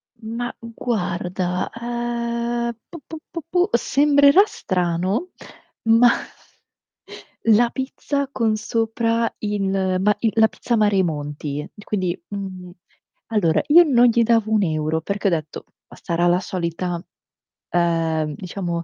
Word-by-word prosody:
Mah, 230 +2 -5 0.2
guarda, 180 -5 -2 0.3
ehm, 235 0 -2 0.2
pu, 340 - -9
pu, 320 - -7 0.2
pu, 335 - -4
pu, 355 - +2 0.2
sembrerà 285 +5 +5
strano, 180 - -1 0.9
ma 245 -1 +7 1.4
la 230 +2 +5
pizza 275 +2 -3
con 225 -4 +1
sopra 230 +1 0
il 205 -2 -1 0.3
ma 210 +1 +3
i 225 -1 +1
la 220 -1 +6
pizza 235 +2 -2
Mari 210 -3 +3
e - - +4
monti. 150 -1 -4 0.2
Quindi 185 -4 -2
mhmm, 190 -3 -6 0.6
allora, 200 -8 +2
io 340 +4 +8
non 245 -6 +4
gli 235 0 +3
davo 225 -1 +2
1€, 160 -6 +1
perché 200 +3 -2
ho - - +5
detto: 155 -2 -3 0.2
"Ma - - -15
sarà 175 0 0
la 175 +1 +3
solita", 175 -1 -3 0.7
ehm, 165 -3 0
diciamo, 175 -1 -4
210 Hz, 125 wpm, -21 LUFS, 175-235 Hz, 1.4 s, io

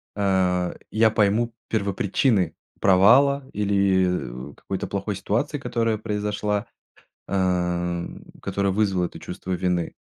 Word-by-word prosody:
э, 95 -3 +1 0.2
я 110 0 +4
пойму 110 +2 +2 0.2
первопричины 100 0 +1 0.2
провала 130 +9 +5
или, 95 -10 0
э, - - -17
какой-то 95 - -5
плохой 100 +1 -3
ситуации, 105 +9 -1
которая 115 -4 -1
произошла, 105 -1 -2 0.6
э, 90 -2 0 0.4
которая 100 -1 0
вызвала 95 -3 +1
это - - -8
чувство 95 - -7
вины. 90 -2 -1
100 Hz, 105 wpm, -24 LUFS, 90-110 Hz, 0.6 s, провала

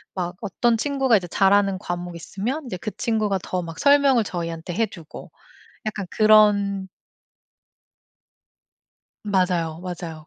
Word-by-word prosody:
막 180 -1 -3
어떤 230 +3 +1
친구가 270 -3 +2
이제 180 -2 -5
잘 195 +3 +3
하는 200 -2 +2
과목이 175 -2 -5
있으면 240 - -4
이제 185 -7 -5
그 215 +3 -5
친구가 215 -4 0
더 185 - -2
막 165 -1 -8
설명을 280 -4 +4
저희한테 170 -2 -5
해 225 +3 +1
주고 170 -6 -12 0.5
약간 205 -2 -3
그런 205 -3 +4 2.4
맞아요. 180 -5 0
맞아요. 170 -3 -7
195 Hz, 265 characters per minute, -23 LUFS, 175-215 Hz, 2.4 s, 설명을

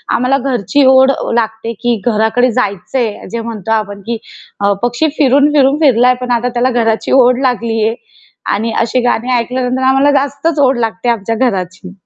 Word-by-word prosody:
आम्हाला 255 +3 +1
घरची 255 +3 +1
ओढ 265 +1 +5 0.2
लागते 225 0 -2
की 240 -2 0
घराकडे 235 +2 +1
जायचंय 220 0 -3
जे 230 0 -3
म्हणतो 225 -2 -6
आपण 205 -2 -2
की 235 0 -2 0.5
अ, 200 0 +3
पक्षी 240 +6 0
फिरून, 285 +1 +3
फिरून 280 0 +3
फिरलाय 250 -3 +4
पण 250 0 -3
आता 240 +1 0
त्याला 245 +1 +1
घराची 225 0 -1
ओढ 250 -1 +4
लागलीये 230 -3 0 0.6
आणि 225 +3 -2
अशी 235 +2 0
गाणी 245 +1 0
ऐकल्यानंतर 250 +2 -2
आम्हाला 270 +2 +3
जास्तच 285 +3 -2
ओढ 270 -2 +3
लागते 225 +1 -2
आमच्या 230 -1 -1
घराची. 185 -1 -6
240 Hz, 160 wpm, -13 LUFS, 225-260 Hz, 0.6 s, ओढ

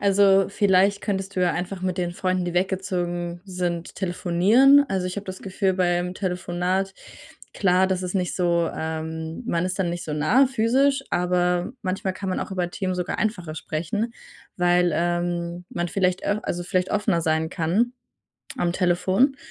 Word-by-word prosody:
also, 195 -1 +4
vielleicht 200 0 +3
könntest 195 -2 -3
du - - +1
ja 180 - +3
einfach 180 +2 -4
mit 185 -1 -1
den 175 -1 0
Freunden, 185 0 -1
die 175 0 -3
weggezogen 175 -2 -1
sind, 180 -3 -3
telefonieren. 200 +10 +4
Also, 190 -2 -1
ich 180 - -4
habe 205 - -4
das 185 0 -7
Gefühl, 190 0 0
beim 180 0 0
Telefonat 180 0 -1 0.6
klar, 185 -1 +3
das 190 -1 -1
ist 180 +1 -4
nicht 180 -3 0
so, 170 -2 +1
ähm 160 +2 -4
man 170 -6 0
ist 185 +1 -3
dann 180 -3 0
nicht 175 0 -4
so 150 - -4
nah 155 - +4
physisch, 270 +3 +2
aber 180 +1 +1
manchmal 190 -1 -2
kann 195 0 -5
man 185 - -1
auch - - -5
über 180 -2 -2
Themen 185 0 -2
sogar 180 -1 -3
einfacher 180 -7 -2
sprechen, 175 +10 -3 0.4
weil, 175 0 +3
ähm, 175 +1 -1
man 175 0 -3
vielleicht 185 0 0
au 205 +1 +1
also, 175 0 -3
vielleicht 185 0 -1
offener 205 -4 +1
sein 160 0 0
kann 185 +9 +1 0.6
am 175 - +1
Telefon 185 +9 +2
180 Hz, 170 wpm, -24 LUFS, 175-195 Hz, 0.6 s, also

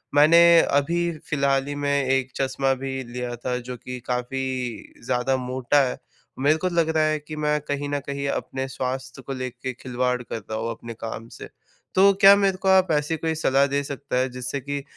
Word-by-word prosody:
मैंने 155 +4 +7 0.2
अभी 145 +5 +1 0.3
फिलहाल 140 -2 +1
ही 145 - -3
में 140 -1 0
एक 130 -1 0
चश्मा 135 0 0
भी 135 - -3
लिया 120 0 -5
था 125 +1 -3
जो 125 - -4
कि 125 +1 -7
काफ़ी 125 +1 -2 0.7
ज़्यादा 125 +1 +1
मोटा 130 +2 +1
है, 125 - -2 0.4
मेरे 150 +3 +3
को 185 - -1
लग 170 -2 +1
रहा 155 - +4
है 155 0 +1
कि 155 +1 -9
मैं 150 0 0
कहीं 145 0 -3
न 145 0 -1
कहीं 140 0 -3
अपने 130 0 -3
स्वास्थ्य 130 +1 -5
को 135 +2 -6
लेके 130 0 -5
खिलवाड़ 125 0 -2
कर - - -6
रहा 110 +1 -6
हूँ, 115 +1 -2
अपने 115 0 -8
काम 115 0 -7
से - - -8 0.5
तो 195 +1 +7
क्या 195 +1 +10
मेरे 195 -2 +1
को 190 - -4
आप 185 -2 +5
ऐसी 150 +2 +1
कोई 160 0 -2
सलाह 140 -2 +3
दे 140 +1 0
सकता 140 -2 -4
है, 130 +1 +1
जिससे 125 +2 -4
कि 140 +1 -4
135 Hz, 200 wpm, -24 LUFS, 125-150 Hz, 0.7 s, क्या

